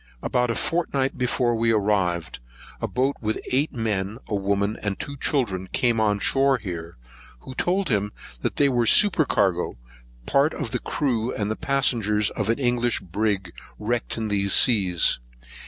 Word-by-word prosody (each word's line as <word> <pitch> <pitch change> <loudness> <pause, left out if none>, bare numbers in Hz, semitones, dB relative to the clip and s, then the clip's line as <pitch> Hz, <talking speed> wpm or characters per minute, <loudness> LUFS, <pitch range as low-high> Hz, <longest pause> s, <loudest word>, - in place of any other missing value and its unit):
About 125 -1 +1
a 115 - 0
fortnight 140 -6 -1
before 125 -1 0
we 115 0 +2
arrived, 95 - 0 0.4
a - - -1
boat, 130 +3 0
with 110 -1 -1
eight 140 +4 +1
men, 110 -3 -2
a - - -5
woman, 100 +1 0
and 100 -2 -2
two 140 - -5
children, 105 - -1
came 120 -2 +2
on 105 -2 +2
shore 135 +6 +3
here, 85 - -7 0.4
who 130 - -9
told 180 +6 0
him 105 -3 0 0.4
they 145 - +3
were 120 -3 +1
the - - +6
supercargo, 105 - +3 0.5
part 140 - +2
of 115 - -4
the - - -1
crew, 125 -4 -1
and 105 +1 -3
passengers 110 -6 +1
of 105 0 -3
an 115 - +2
English 120 -2 +1
brig, 95 -1 -2 0.2
wrecked 120 - -2
in 110 -1 -2
these 100 -1 +1
seas. 95 - +4
110 Hz, 155 wpm, -24 LUFS, 100-130 Hz, 0.5 s, the